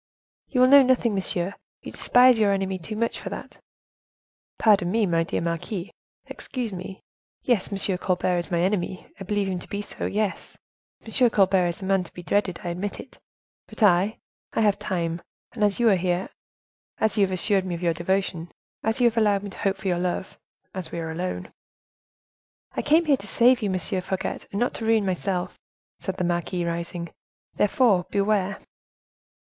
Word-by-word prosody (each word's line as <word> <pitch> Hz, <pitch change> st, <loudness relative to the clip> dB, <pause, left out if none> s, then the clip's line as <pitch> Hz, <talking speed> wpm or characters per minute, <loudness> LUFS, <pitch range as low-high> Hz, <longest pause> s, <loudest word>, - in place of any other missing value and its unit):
"You 250 Hz, -, +1 dB
will 255 Hz, -, +7 dB
know 280 Hz, +1 st, +9 dB
nothing, 250 Hz, -3 st, +2 dB
monsieur; 190 Hz, -1 st, -1 dB, 0.3 s
you -, -, -7 dB
despise 250 Hz, -1 st, +5 dB
your 205 Hz, -2 st, +4 dB
enemy 190 Hz, -1 st, -1 dB
too 215 Hz, +6 st, -6 dB
much 230 Hz, +2 st, -1 dB
for -, -, -6 dB
that." -, -, -9 dB, 1.0 s
"Pardon 200 Hz, -5 st, +4 dB
me, 220 Hz, +2 st, +2 dB
my 165 Hz, -3 st, +2 dB
dear -, -, -2 dB
marquise; 170 Hz, +3 st, -3 dB, 0.3 s
excuse 240 Hz, -5 st, -5 dB
me; 185 Hz, +1 st, -7 dB, 0.4 s
yes, 230 Hz, -7 st, +1 dB
M. 195 Hz, -1 st, -1 dB
Colbert 180 Hz, -1 st, +1 dB
is 175 Hz, -, -6 dB
my 170 Hz, -2 st, +1 dB
enemy, 185 Hz, -1 st, -1 dB
I -, -, -5 dB
believe 205 Hz, 0 st, 0 dB
him 185 Hz, -2 st, -2 dB
to -, -, -12 dB
be 205 Hz, 0 st, -4 dB
so; -, -, -5 dB
yes, 210 Hz, -1 st, -2 dB, 0.5 s
M. 240 Hz, +2 st, +3 dB
Colbert 190 Hz, -4 st, +3 dB
is 175 Hz, +3 st, -4 dB
a -, -, -3 dB
man 195 Hz, -1 st, +2 dB
to 175 Hz, -, -12 dB
be 175 Hz, -, -8 dB
dreaded, 185 Hz, -1 st, 0 dB
I 175 Hz, -, -3 dB
admit. 195 Hz, +8 st, -6 dB, 0.5 s
But -, -, -4 dB
I! 200 Hz, +2 st, +4 dB, 0.4 s
I -, -, +1 dB
have 205 Hz, -2 st, +3 dB
time, 170 Hz, -4 st, -2 dB, 0.3 s
and 225 Hz, -4 st, -2 dB
as 205 Hz, 0 st, +2 dB
you 240 Hz, -, +4 dB
are 200 Hz, -, +5 dB
here, 180 Hz, 0 st, -1 dB, 0.7 s
as 220 Hz, 0 st, +1 dB
you -, -, +6 dB
have 190 Hz, -, +1 dB
assured 190 Hz, +1 st, +1 dB
me 180 Hz, -2 st, -3 dB
of 170 Hz, -, -7 dB
your 170 Hz, -1 st, +2 dB
devotion, 175 Hz, 0 st, -2 dB, 0.3 s
as 220 Hz, +3 st, -1 dB
you -, -, +5 dB
have 235 Hz, -1 st, +2 dB
allowed 205 Hz, -3 st, +3 dB
me 200 Hz, -, -6 dB
to -, -, -12 dB
hope 195 Hz, -1 st, 0 dB
for 195 Hz, -, -6 dB
your 175 Hz, -2 st, +1 dB
love, 180 Hz, +1 st, -3 dB, 0.3 s
as 180 Hz, -4 st, -5 dB
we -, -, -5 dB
are 165 Hz, -1 st, -3 dB
alone—" 180 Hz, +3 st, -4 dB, 1.2 s
"I -, -, -2 dB
came 320 Hz, +3 st, +3 dB
here 285 Hz, -3 st, +4 dB
to 200 Hz, -, -11 dB
save 245 Hz, +3 st, +4 dB
you, 210 Hz, -, 0 dB
Monsieur 185 Hz, +1 st, -1 dB
Fouquet, 190 Hz, +1 st, -3 dB
and 200 Hz, -, -3 dB
not 245 Hz, -, +1 dB
to 225 Hz, -, -5 dB
ruin 225 Hz, -2 st, +3 dB
myself," 185 Hz, -1 st, -2 dB, 0.4 s
said 190 Hz, -1 st, -4 dB
the 180 Hz, -, -1 dB
marquise, 175 Hz, 0 st, -1 dB
rising—"therefore, 175 Hz, +4 st, -1 dB
beware! 200 Hz, -1 st, +1 dB
195 Hz, 190 wpm, -25 LUFS, 180-215 Hz, 1.2 s, know